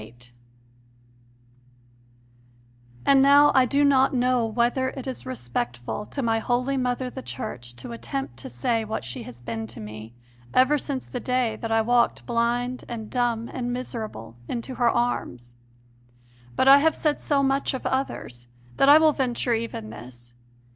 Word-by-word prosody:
VIII 110 +2 -13 2.9
And 275 -1 +6
now 285 +1 +7
I 260 -1 +5
do 280 +4 +2
not 270 -1 +4
know 250 -1 +2
whether 240 +3 +1
it 265 -1 -8
is 260 - -5
respectful 120 - -4
to 275 - -4
my 225 -1 +1
holy 250 +4 0
mother 250 0 -1
the - - -7
Church 120 0 -7
to 120 0 -9
attempt 120 +3 -5
to 120 - -7
say 225 - -1
what 215 -10 -4
she 125 - -5
has 120 0 -10
been 115 -2 -5
to 115 - -9
me 110 +2 -9 0.4
ever 275 +4 +4
since 270 -1 -4
the 250 - -5
day 250 -2 0
that 225 - -5
I 225 0 +3
walked 240 +1 +2
blind 240 +1 -1
and 225 -3 -6
dumb 240 -2 0
and 245 -1 -3
miserable 215 - -6
into 245 +2 -4
her 240 -1 +2
arms. 125 - -2 1.0
But 260 - +2
I 275 +1 +9
have 315 +2 +2
said 300 -2 0
so 280 -2 +1
much 270 0 +1
of 260 - -7
others 125 - -3 0.3
that 275 - +5
I 295 - +10
will 315 -1 +5
venture 250 -2 0
even 225 - -4
this. 120 0 -12
235 Hz, 160 wpm, -25 LUFS, -, 2.9 s, I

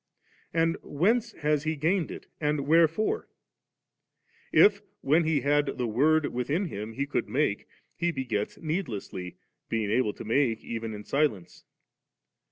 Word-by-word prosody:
And 165 0 +1
whence 220 +9 +1
has 150 -1 0
He 160 0 -1
gained 165 +3 +1
it?' - - -8
and 150 -1 0
wherefore? 165 - +2 1.2
If, 205 -1 +6 0.2
when 155 +4 +3
He 155 -3 +2
had 145 +1 +2
5ie 120 -5 -2
Word 155 +5 +4
within 140 +10 0
Him, 110 - -6
He 140 +4 -2
could 140 - -2
make, - - 0 0.3
He 175 0 0
b^ets 120 -8 -3
needlessly, 120 - -4 0.3
being 110 -2 -1
able 110 -2 +2
to - - -9
make 115 0 +1
even 115 -1 -4
in 105 - -8
silence. 125 - -1
145 Hz, 140 wpm, -28 LUFS, 115-165 Hz, 1.2 s, If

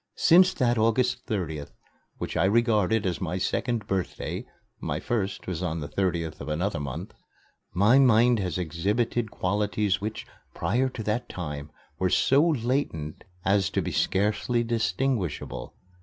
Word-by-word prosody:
Since 180 +2 +6
that 120 -4 +2
August 120 +3 +1
30th, 80 -8 -3 0.4
which - - -5
I - - +3
regard 110 -2 +3
as 90 0 -1
my 90 0 -2
second 115 +4 -1
birthday 95 -2 -3 0.3
(my - - -2
first 105 -4 -2
was 90 -2 -3
on 85 -2 -2
the 75 - -5
30th 85 -3 -2
of 70 - -6
another 85 +2 -1
month), 70 -3 -5 0.6
my 105 +9 +5
mind 120 -2 +5
has 90 -4 -2
exhibited 105 +8 -1
qualities 105 +1 0
which, 110 +1 -4 0.3
prior 130 +2 +1
to 120 -3 -6
that 105 +3 -2
time, 75 -4 -5 0.3
were 95 - +2
so 135 +9 +4
latent 120 - -1 0.2
as 95 -1 +3
to - - -1
be - - -3
scarcely 105 +5 +1
distinguishable. 115 - -2
105 Hz, 140 wpm, -27 LUFS, 90-120 Hz, 0.6 s, Since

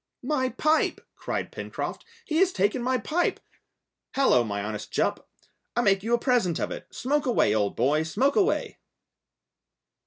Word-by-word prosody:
"My 260 -4 0
pipe," 310 +4 +1 0.2
cried - - -4
Pencroft. - - -5 0.2
"He 315 - -1
has 375 +1 +4
taken 205 - +1
my 255 +1 +1
pipe! 335 +7 0 0.8
Hallo, 195 - +4
my 100 -2 -3
honest 105 0 -5
Jup, - - -1 0.5
I 240 - +3
make 195 -4 +3
you 230 +4 +2
a - - 0
present 235 - +1
of - - -2
it! - - -7
Smoke 290 +2 -1
away, 225 - +3
old 105 -2 0
boy, 140 +6 +2
smoke 260 - +1
away!" 395 - +1
240 Hz, 155 wpm, -26 LUFS, -, 0.8 s, has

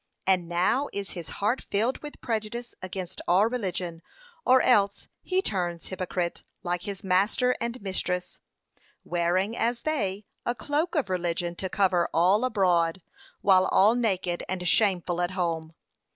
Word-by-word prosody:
And 185 -3 +2
now 185 +11 +1
is 200 -1 -4
his 170 -5 -6
heart 215 +6 -1
filled 225 +6 +1
with 295 -1 -10
prejudice 235 +1 -3
against 185 -1 -5
all 185 +4 +5
religion, 185 -8 -3 0.4
or 260 -1 +5
else 200 -5 +3
he 375 +1 0
turns 175 - -2
hypocrite 180 -2 -3 0.2
like 175 -1 -1
his 200 +2 -6
master 200 +7 +2
and 235 0 -2
his 255 - -12
mistress, 185 -2 -3 0.6
wearing, 180 +5 0
as 235 +1 -1
they, 210 -10 -1 0.2
a 240 - -1
cloak 295 +9 -1
of 270 -11 0
religion 175 -1 -1
to 190 - -3
cover 185 -3 +2
all 185 +7 +4
abroad, 180 -7 +2 0.4
while 190 -1 +5
all 205 +4 +5
naked 190 -7 0
and 180 -1 -2
shameful 180 -3 +2
at 175 - +1
home.' 165 -3 -1
190 Hz, 150 wpm, -27 LUFS, 175-230 Hz, 0.6 s, all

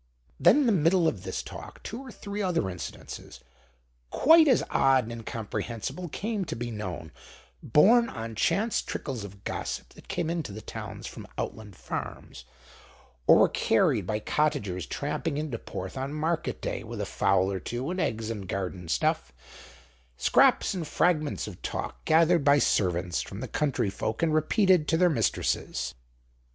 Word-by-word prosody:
Then, 295 - +6
in - - +2
the 235 - +4
middle 170 -1 +3
of 105 - -1
this 95 0 -4
talk, - - -10
two 230 +4 -6
or 265 -2 -9
three 205 -1 -5
other 170 - 0
incidents, 90 - -8 0.7
quite 320 - +6
as 260 - +4
odd 135 -1 +4
and 115 - -7
incomprehensible, 115 - -5
came 210 +5 -2
to - - -4
be 120 0 -4
known, 90 -7 -5 0.5
borne 230 - +5
on 115 -1 -6
chance 210 - +1
trickles 130 -7 -5
of 100 0 -11
gossip - - -4
that - - -17
came 170 -2 -1
into 165 -9 -3
the 105 - -7
towns - - -7
from - - -8
outland 105 -4 -5
farms, - - -6 0.8
or - - +9
were - - +5
carried - - +2
by 110 -1 0
cottagers 110 - -1
tramping 145 +1 -2
into 150 -7 -3
Porth 95 0 -6
on 135 +2 -3
market 160 +2 -2
day 100 - -3
with 115 0 -7
a 105 - -1
fowl 95 0 +2
or 95 - -2
two 125 - -4
and 185 - -3
eggs 115 -5 -1
and 100 -4 -6
garden 90 -2 -4
stuff; 65 -4 0 0.9
scraps - - +4
and 175 -5 -4
fragments 155 -4 +1
of 100 -5 -9
talk - - -5
gathered 165 0 +4
by 140 +1 +6
servants 90 -8 +1
from 95 - -7
the 130 - -4
country 130 -9 0
folk 110 +7 -3
and 160 -2 +2
repeated—to 165 0 +3
their 180 0 +4
mistresses. 115 -7 -1
130 Hz, 165 wpm, -28 LUFS, 105-170 Hz, 0.9 s, or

